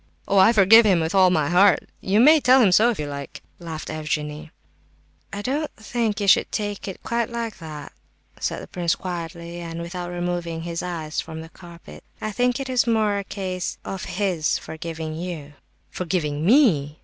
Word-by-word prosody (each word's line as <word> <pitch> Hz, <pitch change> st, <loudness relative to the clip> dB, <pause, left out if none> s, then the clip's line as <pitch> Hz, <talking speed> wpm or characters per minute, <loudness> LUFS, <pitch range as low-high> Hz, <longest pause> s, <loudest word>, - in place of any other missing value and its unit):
"Oh, 195 Hz, -, +3 dB
I 190 Hz, +4 st, +7 dB
forgive 225 Hz, +1 st, +7 dB
him 195 Hz, -5 st, +3 dB
with 160 Hz, +2 st, -2 dB
all 190 Hz, -2 st, +6 dB
my 155 Hz, -5 st, +1 dB
heart; 190 Hz, +3 st, +4 dB
you 195 Hz, +3 st, +1 dB
may 305 Hz, +6 st, +7 dB
tell 260 Hz, -1 st, +5 dB
him 210 Hz, -7 st, +5 dB
so 220 Hz, +6 st, +5 dB
if 235 Hz, -, -1 dB
you 150 Hz, -, -3 dB
like," 140 Hz, -1 st, -7 dB, 0.2 s
laughed 160 Hz, -3 st, -6 dB
Evgenie. 150 Hz, 0 st, -4 dB, 0.8 s
"I 205 Hz, +1 st, -5 dB
don't 290 Hz, +5 st, -1 dB
think 220 Hz, -1 st, -2 dB
you 200 Hz, -, -1 dB
should -, -, +4 dB
take 205 Hz, -1 st, -3 dB
it 190 Hz, -, -8 dB
quite 235 Hz, -1 st, -1 dB
like 230 Hz, -3 st, -5 dB
that," 150 Hz, -3 st, -8 dB, 0.5 s
said -, -, -3 dB
the -, -, -10 dB
prince, 175 Hz, -2 st, -1 dB
quietly, 170 Hz, -1 st, -6 dB
and 165 Hz, -1 st, -6 dB
without 175 Hz, +1 st, -5 dB
removing 175 Hz, -2 st, -3 dB
his 170 Hz, 0 st, -4 dB
eyes 165 Hz, -4 st, -4 dB
from 160 Hz, -1 st, -8 dB
the 160 Hz, -, -11 dB
carpet. 170 Hz, 0 st, -13 dB, 0.2 s
"I 215 Hz, -, -3 dB
think 245 Hz, +4 st, 0 dB
it 270 Hz, -, -4 dB
is 255 Hz, -2 st, +1 dB
more 215 Hz, -3 st, +2 dB
a -, -, -4 dB
case 185 Hz, -2 st, -4 dB
of 190 Hz, -2 st, -5 dB
his 180 Hz, -6 st, 0 dB
forgiving 160 Hz, 0 st, -6 dB
you." 160 Hz, -3 st, -6 dB, 0.4 s
"Forgiving 160 Hz, -4 st, -2 dB
me! 175 Hz, -, +4 dB
180 Hz, 185 wpm, -23 LUFS, 165-210 Hz, 0.8 s, I